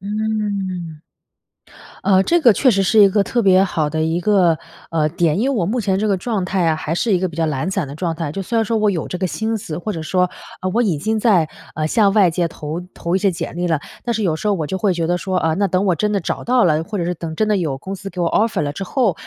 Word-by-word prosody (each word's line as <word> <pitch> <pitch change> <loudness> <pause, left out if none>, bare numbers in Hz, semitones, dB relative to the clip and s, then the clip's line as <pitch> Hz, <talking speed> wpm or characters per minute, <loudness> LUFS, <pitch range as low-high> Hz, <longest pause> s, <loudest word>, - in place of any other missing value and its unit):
嗯。 200 -6 -3 1.0
呃， 190 -1 +4
这 345 - +2
个 245 -7 +6
确 255 +6 +3
实 195 -3 +2
是 215 +3 +2
一 200 - +8
个 200 +1 +2
特 240 - -1
别 190 -1 +5
好 160 -5 -1
的 155 +1 -2
一 160 +2 0
个， 180 -4 +3 0.3
呃， 155 -2 +1
点。 165 -1 +1
因 220 - +1
为 270 - -1
我 170 -5 0
目 235 +4 0
前 190 -2 0
这 215 - 0
个 195 - +2
状 210 -1 -2
态 185 -2 0
啊， 160 - +3
还 155 +1 -3
是 215 +5 0
一 180 - +3
个 185 - -1
比 165 - -11
较 165 - +1
懒 155 +4 -2
散 190 -6 -1
的 140 - -8
状 165 +1 -2
态， 165 -4 -3
就 195 - -4
虽 230 +5 -3
然 225 - +3
说 225 +2 -1
我 210 -1 +3
有 170 -5 -2
这 180 - -4
个 190 - 0
心 220 +5 -2
思， 165 -7 -6
或 210 +4 -4
者 165 - -5
说， 180 +3 +1 0.4
啊， 185 - -2
我 240 - +3
已 190 -9 +1
经 220 +7 -1
在， 195 -8 +4 0.3
呃， 155 0 -1
向 200 +3 +3
外 195 -5 +5
界 170 +1 0
投 155 +2 -6
投 170 +1 -3
一 - - +2
些 195 0 +2
简 170 - -5
历 175 0 -1
了。 160 -3 +1 0.3
但 240 - 0
是 220 - -1
有 170 -5 +1
时 210 - -5
候 205 - +3
我 160 -5 -2
就 190 - -3
会 195 -1 +2
觉 165 -1 -1
得 175 +1 +1
说： 185 +1 -2
“啊， 160 -2 +1
那 200 +2 +1
等 185 +1 0
我 180 - +3
真 210 +6 0
的 200 - +1
找 165 - -3
到 245 0 +3
了， 155 -2 +2
或 210 +5 -5
者 170 - -1
是 180 - -1
等 160 -1 -6
真 215 - +1
的 210 - +2
有 155 -7 -2
公 190 +7 -6
司 195 - -7
给 180 - -6
我 170 -1 +1
offer 220 -4 +1
了 145 0 -2
之 195 - -6
后， 230 -1 +1
185 Hz, 330 characters per minute, -19 LUFS, 165-210 Hz, 1.0 s, 一